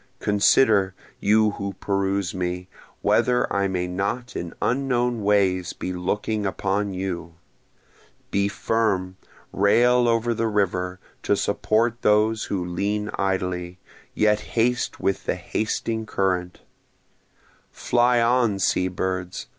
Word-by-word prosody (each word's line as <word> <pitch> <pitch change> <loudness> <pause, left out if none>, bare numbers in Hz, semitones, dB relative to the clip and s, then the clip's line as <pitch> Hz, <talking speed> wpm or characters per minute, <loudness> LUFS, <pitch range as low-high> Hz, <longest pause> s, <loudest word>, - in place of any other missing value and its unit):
Consider, 100 -1 +3 0.2
you 110 +1 +3
who 100 -1 -5
peruse 100 0 -1
me, 90 0 -3 0.4
whether 125 -1 +3
I 100 0 +1
may 90 -2 -1
not 100 +7 -3
in 85 -1 -4
unknown 125 -2 0
ways 95 -3 +2
be 90 - -5
looking 105 +4 -2
upon 100 0 -1
you; 85 -3 -4 1.0
Be 100 0 +2
firm, 100 -4 -1 0.4
rail 120 +5 +4
over 115 0 +1
the 115 0 -1
river, 95 -3 -1 0.2
to 100 - +1
support 110 +4 0
those 110 +1 +2
who 95 -3 -2
lean 100 +4 -2
idly, 90 -2 -2 0.4
yet 105 0 +3 0.2
haste 120 +1 +1
with 95 - -1
the - - +1
hasting 110 +1 -3
current; 90 -3 -1 1.1
Fly 120 0 +2
on, 120 -3 +2
sea 90 -1 +1
birds! 95 0 -3
100 Hz, 115 wpm, -24 LUFS, 95-110 Hz, 1.1 s, rail